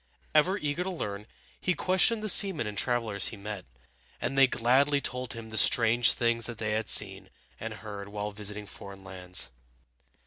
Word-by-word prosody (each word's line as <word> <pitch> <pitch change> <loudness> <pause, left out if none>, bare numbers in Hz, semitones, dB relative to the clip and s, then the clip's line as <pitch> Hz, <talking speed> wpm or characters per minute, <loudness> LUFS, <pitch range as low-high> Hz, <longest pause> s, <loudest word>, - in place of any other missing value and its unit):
Ever 180 +6 +2
eager 150 0 -3
to 190 - -5
learn, 105 - -6 0.3
he 180 - -1
questioned 190 +7 +2
the - - -3
seamen 190 - +5
and 105 -1 -6
travelers 110 -4 -1
he 115 - -5
met, 100 -1 -8 0.5
and 135 - -4
they 135 0 +5
gladly 135 +5 +1
told 125 -2 -5
him 115 -1 -10
the 110 - 0
strange 115 +2 +4
things 115 -1 -1
they 115 -2 -5
had 110 0 -3
seen - - +5 0.3
and 115 - -6
heard 105 -2 -9
while 105 0 -5
visiting 105 0 -7
foreign 100 0 -12
lands. 90 -8 -1
115 Hz, 170 wpm, -27 LUFS, 105-140 Hz, 0.5 s, seamen